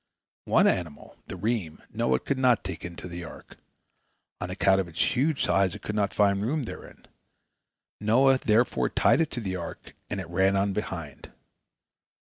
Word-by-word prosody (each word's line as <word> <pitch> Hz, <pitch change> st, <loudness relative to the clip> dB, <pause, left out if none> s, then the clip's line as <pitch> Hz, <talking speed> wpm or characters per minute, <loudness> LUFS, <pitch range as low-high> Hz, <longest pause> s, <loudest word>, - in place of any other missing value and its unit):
One -, -, +4 dB
animal, 85 Hz, -5 st, -1 dB
the -, -, -6 dB
reem, 95 Hz, -4 st, -3 dB
Noah 65 Hz, 0 st, +1 dB
could 140 Hz, -2 st, -2 dB
not 125 Hz, -4 st, +3 dB
take 95 Hz, -, -6 dB
into 85 Hz, +1 st, -7 dB
the 85 Hz, 0 st, -7 dB
ark. 80 Hz, -, -12 dB, 0.8 s
On 90 Hz, -, -4 dB
account 95 Hz, +1 st, +3 dB
of 90 Hz, -, -6 dB
its 85 Hz, +8 st, -1 dB
huge 145 Hz, +3 st, +1 dB
size 95 Hz, -2 st, +2 dB
it -, -, -11 dB
could 105 Hz, -, -4 dB
not 105 Hz, -1 st, 0 dB
find 100 Hz, -1 st, +2 dB
room 140 Hz, +7 st, -1 dB
therein. 115 Hz, -, -10 dB, 0.9 s
Noah 130 Hz, +5 st, +4 dB
therefore 105 Hz, -, +2 dB
tied -, -, +3 dB
it 160 Hz, -, 0 dB
to 120 Hz, -, -4 dB
the 95 Hz, -3 st, -3 dB
ark, 85 Hz, -2 st, -8 dB, 0.2 s
and 105 Hz, -, -3 dB
it 95 Hz, -, -6 dB
ran 95 Hz, +3 st, +2 dB
on 100 Hz, 0 st, +1 dB
behind. 85 Hz, -8 st, -6 dB
100 Hz, 170 wpm, -27 LUFS, 90-115 Hz, 0.9 s, One